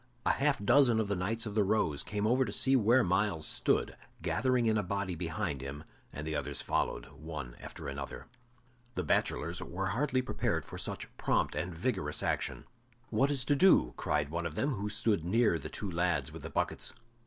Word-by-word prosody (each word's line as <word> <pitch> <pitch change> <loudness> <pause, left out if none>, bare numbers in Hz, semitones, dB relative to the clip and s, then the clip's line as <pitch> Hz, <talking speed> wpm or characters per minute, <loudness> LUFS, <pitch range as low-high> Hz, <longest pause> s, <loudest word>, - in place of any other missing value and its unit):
A - - +5
half 140 0 +2
dozen 120 -2 +5
of 105 -2 0
the 100 - +1
Knights 110 +6 -1
of 105 - -4
the 105 -1 +3
Rose 95 -8 +2
came 105 0 -2
over 125 +4 +4
to 130 +4 +2
where 120 +2 +5
Myles 90 -3 +1
stood, - - +1 0.3
gathering 125 -2 +2
in 110 -1 +3
a 105 - +2
body 100 0 -2
behind 80 -5 -3
him 70 +2 -6 0.3
and 75 - -6
the 80 - -2
others 70 -1 -1
followed, - - -1
one 75 -6 -7
after - - -8
another. 70 -1 -6 0.7
The 90 - -1
bachelors 85 +2 0
were 95 +3 -3
hardly 130 +4 +1
prepared - - -1
for - - -8
such - - -4
prompt - - +1
and 90 - -2
vigorous 85 - -1
action. - - -1 0.5
"What 130 +5 +3
is 135 -3 0
to 145 - +3
do?" 140 - +5
cried 75 -1 0
one 85 +1 -2
of 80 - -8
them, 145 - +1
who 105 -2 -3
stood 105 -4 +1
near 95 -1 +3
the - - -6
two 100 - -5
lads 85 +1 0
with - - -9
the - - -6
buckets. - - -1
100 Hz, 195 wpm, -32 LUFS, 80-115 Hz, 0.7 s, A